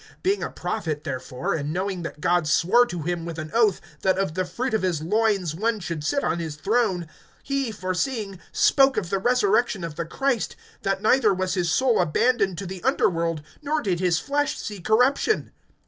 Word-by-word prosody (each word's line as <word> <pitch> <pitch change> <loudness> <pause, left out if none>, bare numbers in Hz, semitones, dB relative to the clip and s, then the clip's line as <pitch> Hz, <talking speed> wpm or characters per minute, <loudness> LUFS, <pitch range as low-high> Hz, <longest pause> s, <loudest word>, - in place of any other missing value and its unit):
(30)Being 390 +2 +1
a - - -2
prophet, 160 -8 -3
therefore, 130 -2 -3
and 150 -2 -2
knowing 185 +1 -2
that 165 -2 -6
God 175 0 +2
swore 200 +11 +4
to 175 -6 -5
him, 175 +1 -2
with 165 -1 -6
an 155 -1 -6
oath, 225 -5 +3 0.2
that 190 -1 +2
of 195 -5 -1
the 185 +2 -1
fruit 250 +7 -3
of 220 - +2
his 175 -5 -1
loins 200 -3 +1
one 220 +6 0
should 170 -5 -4
sit 280 - 0
on 170 - 0
his 160 -3 -4
throne, 195 -1 0 0.4
(31)he, 275 -4 -1
foreseeing, 195 +1 -2
spoke 270 -1 +4
of 175 - -2
the 195 - +1
resurrection 220 -3 +2
of 165 -3 -6
the 170 - -2
Christ, 265 - -1 0.3
that 195 0 -1
neither 220 -3 +4
was 185 0 -1
his 175 -4 0
soul 255 -2 +3
abandoned 195 +3 +1
to 195 - -5
the 185 0 -7
underworld, 165 -3 +1 0.2
nor 300 +1 0
did 190 - -1
his 180 -2 +2
flesh 290 - -1
see 205 -2 -6
corruption. 250 - +2
190 Hz, 195 wpm, -24 LUFS, 170-230 Hz, 0.4 s, swore